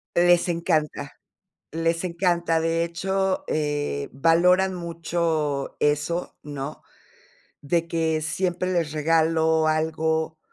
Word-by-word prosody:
Les 175 0 +4
encanta, 165 -3 -1 0.6
les 165 +1 -1
encanta, 170 -2 +1
de 165 +1 +1
hecho, 190 +3 -1
eh, 145 - -2
valoran 180 +6 +3
mucho 165 -4 -2
eso, 150 +4 0
¿no? 145 0 -6 0.8
De 165 +3 0
que 160 -1 0
siempre 180 +3 -1
les 170 -4 0
regalo 160 +1 +2
algo, 160 0 0
165 Hz, 95 wpm, -24 LUFS, 155-170 Hz, 0.8 s, Les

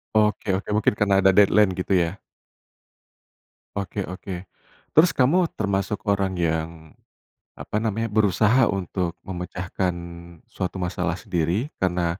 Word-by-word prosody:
Oke 105 -2 +2
oke, 95 - -3
mungkin 105 - +3
karena 105 -1 +2
ada 95 - +7
deadline 105 0 +5
gitu 90 +1 -2
ya? 85 +2 -1 1.6
Oke 100 0 -3
oke, 90 0 -7 0.5
terus 165 +4 +6
kamu 165 +7 +3
termasuk 100 0 -1
orang 100 -2 +1
yang, 80 -1 0 0.9
apa 105 - -3
namanya, 110 0 -2
berusaha 110 +4 +3
untuk 90 -2 -2
memecahkan 90 0 -3 0.6
suatu 95 0 -4
masalah 90 -1 -1
sendiri 95 - -1
karena, 90 -1 0
95 Hz, 120 wpm, -24 LUFS, 90-105 Hz, 1.6 s, ada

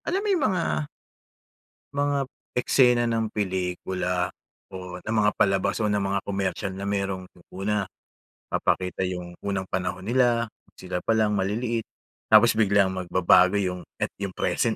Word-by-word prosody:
alam 380 +4 -1
mo - - -1
'yung 325 -8 +2
mga 75 - -1 1.1
mga 145 -1 +1 0.3
eksena 125 -1 +4
ng 115 -1 0
pelikula 90 -2 -2 0.4
o 90 -1 -7
ng 110 - -4
mga 105 - +4
palabas 95 0 +2
o 110 - +1
ng 105 -1 +1
mga 100 0 0
komersyal 100 0 -2
na 100 +1 -5
merong 100 -2 -2 0.3
una 100 +1 -1 0.7
papakita 90 0 0
'yung 90 -1 -5
unang 100 -1 -2
panahon 95 +1 -3
nila, 120 -1 +3 0.3
sila 90 -1 -4
palang 110 -2 +2
maliliit 110 +4 -1 0.4
tapos - - +7
biglang 100 -3 +3
magbabago 90 +1 +4
'yung, 90 -2 -1 0.2
at - - -1
'yung 95 -2 -3
present - - 0
100 Hz, 140 wpm, -25 LUFS, 90-110 Hz, 1.1 s, tapos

